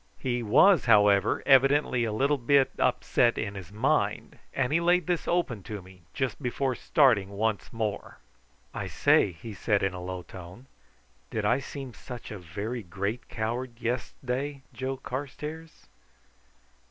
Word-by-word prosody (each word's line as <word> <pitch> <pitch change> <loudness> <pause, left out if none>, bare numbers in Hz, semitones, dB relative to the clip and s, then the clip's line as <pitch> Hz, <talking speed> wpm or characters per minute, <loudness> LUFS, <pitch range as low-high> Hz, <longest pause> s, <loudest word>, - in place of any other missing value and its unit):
He 120 -2 -2
was, 135 - +5
however 105 -3 +4
evidently 135 -2 +4
a 110 - -2
little 140 +6 +1
bit 135 +2 +3
upset 120 -1 +2
in 105 -2 -3
his 95 -3 -9
mind, 105 +2 0
and 135 +1 -1
he 165 - +4
laid 175 0 +3
this 175 -2 -1
open 155 - 0
to 105 -1 -5
me 95 0 -16
just 130 +1 -3
before 130 +1 -1
starting 120 -7 +3
once 105 +1 -2
more. 110 -3 -4 0.6
"I - - -4
say," 95 - +3
he 95 +7 -9
said 100 +1 0
in 95 -1 0
a 90 - -6
low 90 0 -5
tone, 95 +8 -11 0.6
"did 110 -2 -2
I 120 +5 +3
seem 135 -1 -7
such 125 -1 -9
a 105 - -6
very 100 +8 -5
great 100 +5 -4
coward 120 +2 -4
yes'day, 125 +4 -3
Joe 130 +2 -3
Carstairs?" 150 +5 -7
120 Hz, 150 wpm, -28 LUFS, 105-135 Hz, 0.6 s, was